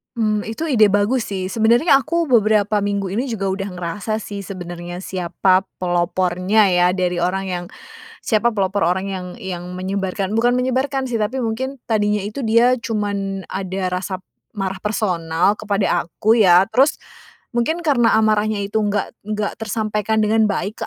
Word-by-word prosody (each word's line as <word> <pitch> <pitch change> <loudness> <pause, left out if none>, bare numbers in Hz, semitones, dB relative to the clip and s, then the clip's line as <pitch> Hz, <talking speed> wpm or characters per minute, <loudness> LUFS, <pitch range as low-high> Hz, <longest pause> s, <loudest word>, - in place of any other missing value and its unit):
Mmm, 215 -2 0
itu 225 +10 -4
ide 220 -8 +4
bagus 205 +5 +2
sih. 190 -1 -2
Sebenarnya 230 - +4
aku 335 +1 0
beberapa 215 -4 +3
minggu 200 -1 -1
ini 235 +8 -2
juga 200 -3 -2
udah 195 +1 -2
ngerasa 180 +5 -3
sih 200 -1 -7
sebenarnya 175 -2 -7
siapa 185 0 +1 0.2
pelopornya 180 +3 +1
ya 180 -1 +3
dari 180 -1 -1
orang 190 +2 -1
yang 175 -1 -3 0.6
siapa 230 +1 +1
pelopor 195 -2 0
orang 190 +3 0
yang 185 -2 -5
yang 180 -2 -6
menyebarkan, 190 +1 -2
bukan 240 +2 +3
menyebarkan 260 +1 -1
sih 230 - 0
tapi 235 +5 -1
mungkin 255 +3 -3
tadinya 210 -2 +1
itu 210 +6 -6
dia 240 +3 +4
cuman 200 -3 -3
ada 190 -1 -3
rasa 185 +1 -4 0.3
marah 195 -2 -3
personal 185 -3 0
kepada 200 -5 0
aku 220 +7 +2
ya, 185 0 +5
terus 270 +7 +2 0.5
mungkin 285 +9 -1
karena 250 -8 +3
amarahnya 215 -1 +2
itu 205 +2 -1
nggak 205 -1 -2
nggak 210 -1 -2
tersampaikan 215 0 -1
dengan 220 +1 +3
baik 205 +1 -3
205 Hz, 150 wpm, -20 LUFS, 185-220 Hz, 0.6 s, ya